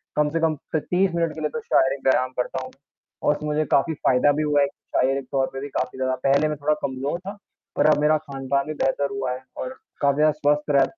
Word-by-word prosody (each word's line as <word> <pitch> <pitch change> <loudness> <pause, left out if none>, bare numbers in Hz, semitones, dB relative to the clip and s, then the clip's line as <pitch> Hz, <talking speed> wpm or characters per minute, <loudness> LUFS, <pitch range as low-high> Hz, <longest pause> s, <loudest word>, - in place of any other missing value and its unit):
कम 150 0 +2
से 165 +2 -1
कम 160 -1 +2 0.2
त - - +4
30 185 +1 +3
मिनट 165 -2 0
के 155 - -6
लिए 150 - 0
तो 235 - -4
शारीरिक 135 -7 +2
व्यायाम 130 -1 +3
करता 125 +1 -2
हूँ, 130 - -9 0.5
और 150 - +3
उसमें 150 0 -5
मुझे 150 +1 +1
काफ़ी 160 +4 +3
फ़ायदा 140 0 +3
भी - - +1
हुआ 145 -1 +3
है। 140 - +3
शारीरिक 135 -1 -1
तौर 135 -1 +1
पे 135 - -5
भी 140 - -4
काफ़ी 130 - -3
ज़्यादा, 130 0 0
पहले 140 +3 +3
मैं 150 - -3
थोड़ा 150 +1 +1
कमज़ोर 135 +5 -3
था 205 +1 -6 0.4
पर - - +2
अब 150 - +4
मेरा 155 +1 +4
खान-पान 140 -2 -2
भी 155 - -3
बेहतर 140 0 0
हुआ 135 -2 -2
है 130 +1 -5 0.2
और - - -3 0.3
काफ़ी 140 -1 +3
ज़्यादा 155 0 +5
स्वस्थ 150 0 0
रह 135 - +6
145 Hz, 245 wpm, -24 LUFS, 135-155 Hz, 0.5 s, रह